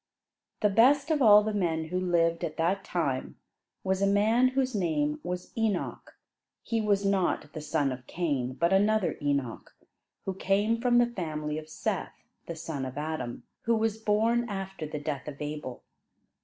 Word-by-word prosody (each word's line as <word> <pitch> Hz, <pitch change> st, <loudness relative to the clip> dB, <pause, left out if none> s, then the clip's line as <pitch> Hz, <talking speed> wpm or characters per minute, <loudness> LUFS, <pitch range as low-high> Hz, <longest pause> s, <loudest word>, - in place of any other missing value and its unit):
The 210 Hz, -, +4 dB
best 275 Hz, +9 st, +4 dB
of 300 Hz, -2 st, +2 dB
all 210 Hz, -3 st, +8 dB
the 215 Hz, 0 st, -2 dB
men 165 Hz, -5 st, -1 dB
who 180 Hz, +2 st, -1 dB
lived 170 Hz, -2 st, +1 dB
at 160 Hz, -3 st, -3 dB
that 185 Hz, +4 st, +1 dB
time 140 Hz, -7 st, -2 dB, 0.5 s
was 190 Hz, 0 st, 0 dB
a 200 Hz, -, +4 dB
man 220 Hz, +5 st, +4 dB
whose 260 Hz, 0 st, 0 dB
name 150 Hz, -6 st, 0 dB
was 180 Hz, 0 st, -5 dB
Enoch. 220 Hz, -5 st, -2 dB, 0.5 s
He 230 Hz, -1 st, -1 dB
was 205 Hz, -2 st, +1 dB
not 190 Hz, -6 st, 0 dB
the 155 Hz, -, -5 dB
son 145 Hz, -2 st, 0 dB
of 125 Hz, -1 st, -8 dB
Cain, 140 Hz, -7 st, -1 dB
but 170 Hz, +7 st, +1 dB
another 205 Hz, 0 st, +2 dB
Enoch, 140 Hz, -5 st, -2 dB, 0.5 s
who 190 Hz, -, -2 dB
came 205 Hz, +4 st, +1 dB
from 245 Hz, -1 st, +3 dB
the 240 Hz, -, +6 dB
family 155 Hz, -9 st, -3 dB
of 155 Hz, 0 st, -12 dB
Seth, -, -, -3 dB, 0.3 s
the 170 Hz, -, -5 dB
son 155 Hz, -4 st, -5 dB
of 130 Hz, +1 st, -6 dB
Adam, 150 Hz, -5 st, -4 dB, 0.2 s
who 230 Hz, 0 st, +3 dB
was 220 Hz, -1 st, 0 dB
born 225 Hz, +3 st, +1 dB
after 195 Hz, -5 st, -5 dB
the 150 Hz, -, -5 dB
death 145 Hz, -2 st, -4 dB
of 145 Hz, -2 st, -7 dB
Abel. 150 Hz, -4 st, -5 dB
180 Hz, 170 wpm, -28 LUFS, 150-215 Hz, 0.5 s, all